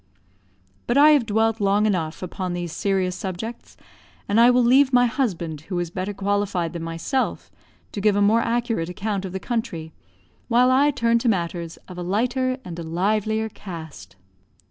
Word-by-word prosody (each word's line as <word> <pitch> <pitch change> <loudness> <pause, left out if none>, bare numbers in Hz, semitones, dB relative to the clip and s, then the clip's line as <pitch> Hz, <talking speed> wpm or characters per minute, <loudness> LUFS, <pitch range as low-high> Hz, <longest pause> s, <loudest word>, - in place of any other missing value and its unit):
But 240 - +1
I 300 +2 +8
have 280 -7 +3
dwelt 225 +1 +1
long 200 +1 +3
enough 175 -5 -1
upon 185 0 -4
these 175 -1 -4
serious 190 0 -1
subjects; 195 +4 -6 0.5
and 205 +3 +2
I 240 - +7
will 250 0 +4
leave 260 +3 +5
my 245 -1 +5
husband, 175 - -2
who 180 - -2
is 175 -1 -2
better 185 +3 -3
qualified 200 -4 -1
than 170 - -5
myself, 165 +11 -2 0.4
to 205 - -5
give 210 0 +3
a - - +2
more 220 +3 +4
accurate 230 -7 -1
account 195 +2 -3
of 185 - -5
the 190 - -4
country, 175 -9 -4 0.5
while 250 +2 +4
I 280 +3 +4
turn 235 -4 +2
to 235 - +1
matters 170 -4 -2
of 180 -1 -9
a - - -3
lighter 250 +8 0
and 170 -1 -7
a - - -5
livelier 215 +6 0
cast. 160 - -10
205 Hz, 175 wpm, -23 LUFS, 175-235 Hz, 0.5 s, I